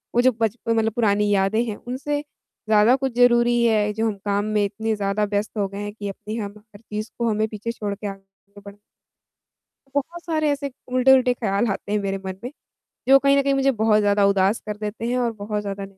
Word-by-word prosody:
वो 240 - +5
जो 255 +1 +5
बचपन 230 +1 0
मतलब 225 0 +2
पुरानी 210 -3 +2
यादें 200 +3 +2
हैं 215 -3 -4
उनसे 290 +3 -2
ज़्यादा 220 -5 +1
कुछ 265 -2 -2
ज़रूरी 240 -1 +4
है 210 -2 +2
जो 225 +1 0
हम 210 - -2
काम 205 0 0
में 205 - +3
इतने 220 +2 -2
ज़्यादा 200 +1 -1
व्यस्त 205 +1 -2
हो 200 -1 +1
गए 200 +1 -8
हैं 205 - -4
कि 205 -2 -6
अपनी 210 +2 -7
हम 205 -2 -4
हर 210 0 -18
चीज़ 215 0 -6
को 235 -1 +1
हमें 215 0 0
पीछे 220 +2 -5
छोड़ 205 -3 -4
के 205 0 -6
आगे 195 +1 -12
बढ़ 200 0 -10 1.2
बहुत 335 +5 -3
सारे 310 -3 0
ऐसे 280 -1 -2 0.2
उल्टे-उल्टे 255 0 +5
ख्याल 205 -1 0
आते 205 +1 -4
हैं 210 - +2
मेरे 195 0 -2
मन 190 0 -4
में, 250 - -4 0.6
जो 275 0 +8
कहीं 275 0 +3
न - - +3
कहीं 275 0 +1
मुझे 270 0 +3
बहुत 220 -2 +2
ज़्यादा 205 0 +3
उदास 200 +2 +2
कर 210 -1 -4
देते 210 +2 -5
हैं 250 +1 0
और 235 -2 0
बहुत 210 0 -4
ज़्यादा 200 -1 -5
215 Hz, 220 wpm, -23 LUFS, 205-245 Hz, 1.2 s, जो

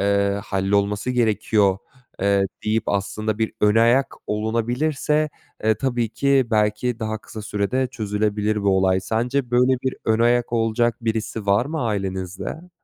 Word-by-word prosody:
eee, 100 0 +1
hallolması 100 +3 0
gerekiyor." 110 -4 +2 0.4
eee, 100 0 +3 0.2
deyip 110 +1 +1
aslında 105 +2 -1
bir 110 -1 0
ön 105 0 +4
ayak 120 +4 +3
olunabilirse, 125 +8 0 0.4
eee, 110 0 +4
tabii 120 0 -1
ki 135 +2 +2
belki 105 +2 +1
daha 110 -1 -3
kısa 110 0 -9
sürede 105 +6 -1
çözülebilir 105 -2 -1
bu 100 -1 +3
olay. 95 0 +2
Sence 120 +5 -1
böyle 125 +1 +4
bir 130 - -2
ön 110 0 +2
ayak 120 0 +2
olacak 115 0 +1
birisi 110 -2 -3
var 100 +5 +3
mı 155 0 -3
ailenizde? 95 - -4
110 Hz, 140 wpm, -22 LUFS, 100-120 Hz, 0.4 s, ön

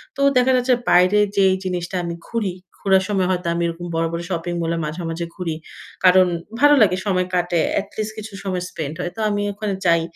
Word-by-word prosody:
তো 275 - -4 0.2
দেখা 250 +1 +4
যাচ্ছে 250 +1 +2 0.2
বাইরে 180 +4 +5 0.2
যেই 190 -1 +5
জিনিসটা 180 0 -3
আমি 170 0 -4
ঘুরি, 210 -6 -2 0.3
ঘুরার 190 -1 +3
সময় 190 -3 +1
হয়তো 180 -1 -2
আমি 170 - -1
এরকম 170 +1 -5
বড়, 165 0 +1
বড় 170 0 -3
শপিং 175 -1 -2
মলে 165 0 -1
মাঝে, 155 +4 -5
মাঝে 170 +1 -3
ঘুরি। 170 -4 -3 0.5
কারণ 185 0 +6 0.3
ভালো 290 0 +6
লাগে 185 -3 +4
সময় 185 -2 +1
কাটে। 175 -1 +1 0.2
এটলিস্ট 215 +2 -5
কিছু 215 -1 -8
সময় 185 -2 -2
স্পেন্ড 155 -2 -5
হয়। 175 -1 -3
তো - - -9
আমি 205 0 -1
ওখানে 205 0 -3
যাই। 170 -1 +4
185 Hz, 200 wpm, -21 LUFS, 170-205 Hz, 0.5 s, কারণ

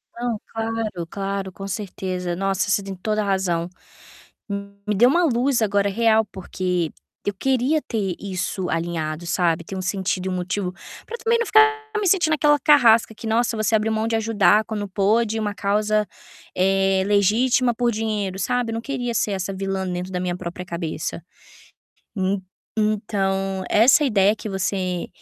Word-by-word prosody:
Não, 235 -2 -2
claro, 225 -6 -3
claro, 195 0 -3
com 195 +2 -8
certeza. 185 -3 -4
Nossa, 195 +2 0
você 205 - +2
tem 195 -1 -6
toda 215 +3 -1
razão. 185 -4 0 1.2
Me 210 - +1
deu 240 +5 +6
uma 345 +6 +3
luz 255 -2 +1
agora 200 -1 +2
real, 220 +1 +3
porque 180 -3 -2 0.3
eu 205 - 0
queria 265 +7 +1
ter 195 -6 -2
isso 190 -1 -3
alinhado, 165 -1 -2
sabe. 170 -1 +1
Ter 195 - -7
um 185 - -3
sentido 190 0 -1
e - - -1
um - - -2
motivo 185 +1 -2 0.3
para 470 - -6
também 460 +1 +1
não 470 - 0
ficar 435 +1 +7 0.3
me 405 - 0
sentindo 340 -4 +3
aquela 295 -1 +3
carrasca 235 -6 +5
que, 230 - -10
"Nossa, 225 +1 +1
você 215 +1 0
abriu 220 0 +2
mão 220 0 0
de 230 - 0
ajudar 220 -1 +3
quando 210 -2 -4
pôde 215 +3 +1
uma 205 -2 -2
causa, 210 +1 +1 0.5
eh, 195 0 +2
legítima 225 +5 +3
por 240 +1 +1
dinheiro", 210 -4 -2
sabe? 245 +2 -1
Não 225 0 -3
queria 245 -3 -3
ser 210 -1 +1
essa 190 0 -2
vilã 195 0 -3
dentro 180 +1 -4
da 180 - -2
minha 180 -1 -2
própria 180 0 -6
cabeça. 170 -1 -4 0.9
En 190 0 0 0.4
então, 195 -3 -1
essa 240 +8 +5
ideia 205 -5 +3
que 215 - -6
você 185 -2 -2
205 Hz, 165 wpm, -22 LUFS, 190-225 Hz, 1.2 s, ficar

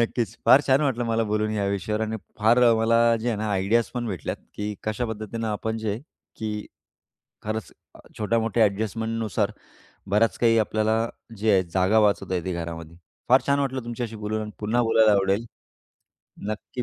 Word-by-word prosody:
नक्कीच. 115 -2 -1
फार 135 - +8
छान 135 +2 +4
वाटलं 130 -5 0
मला 115 -1 +1
बोलून 105 0 0
ह्या 105 -2 -1
विषयावर, 100 +2 -2
आणि 110 0 -2 0.2
फार 115 +3 +4
अ, 120 -1 +6
मला 115 +1 +4
जे 120 - -1
आहे 115 - 0
ना, 110 0 -2
आयडियाज 100 +4 +2
पण 120 -1 -2
भेटल्यात, 95 -4 -4 0.2
की 105 0 -3
कशा 110 +3 -1
पद्धतीनं 110 +1 -4
आपण 110 +2 -2
जे, 110 -1 -2 0.4
की 105 -1 -4 0.8
खरंच 110 +1 -4 0.2
अ, - - -15 0.2
छोट्या-मोठ्या 115 0 +2
ॲडजस्टमेंटनुसार 110 +1 -2 0.6
बराच 110 +3 +2
काही 115 -1 +4
आपल्याला 110 +1 +1 0.4
जे 110 +2 +1
आहे, 95 -1 +4
जागा 95 +5 +2
वाचवता 100 -3 +1
येते 90 +1 -2
घरामध्ये. 85 -1 -6 0.3
फार 130 +2 +6
छान 140 0 +3
वाटलं 130 -3 -2
तुमच्याशी 120 -1 -5
बोलून 105 +1 -3
आणि 105 - -6
पुन्हा 115 +3 +1
बोलायला 110 -2 +4
आवडेल. 100 +3 +1 1.0
नक्की 110 +3 -5
110 Hz, 170 wpm, -25 LUFS, 105-115 Hz, 1.0 s, फार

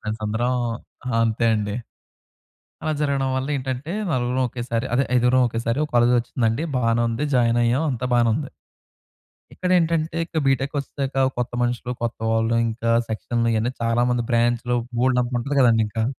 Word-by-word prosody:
Friends 110 0 -5
అందరం 115 +4 0 0.7
అంతే 115 +1 0
అండి. 105 -1 -2 1.1
అలా 155 - 0
జరగడం 140 -2 0
వల్ల 130 +1 -2
ఏంటంటే 130 +4 -4 0.2
నలుగురం 125 0 0
ఒకేసారి 120 0 -3
అదే 135 +3 +3
ఐదుగురం 125 +1 +4
ఒకేసారి 115 +3 -2
ఒక 150 - -8
కాలేజ్ 120 +1 +4
వచ్చిందండి. 120 +2 -1
బానే 115 -1 +2
ఉంది. 115 +6 -1
జాయిన్ 120 -1 +3
అయ్యాం. 120 +5 +2
అంతా 125 -1 -2
బానే 120 -1 +4
ఉంది. 140 +1 -4 1.0
ఇక్కడ 180 - -2
ఏంటంటే, 165 -1 0
ఇక 165 - -3
బీటెక్‌కి 135 +2 +1
వచ్చేసాక 135 -1 -1
కొత్త 120 0 -2
మనుషులు 120 0 -1
కొత్తవాళ్ళు 115 0 0
ఇంకా 115 +1 -2 0.2
సెక్షన్‌లు 115 +1 -1
ఇయన్నీ 115 +3 0
చాలా 115 +1 +2
మంది 120 -1 0
బ్రాంచ్‌లు 120 +1 +1 0.2
బోల్డంత 125 0 +1
ఉంటది 140 +4 -3
కదండీ 115 -3 +5
ఇంక! 110 +1 -1
120 Hz, 150 wpm, -23 LUFS, 115-130 Hz, 1.1 s, కదండీ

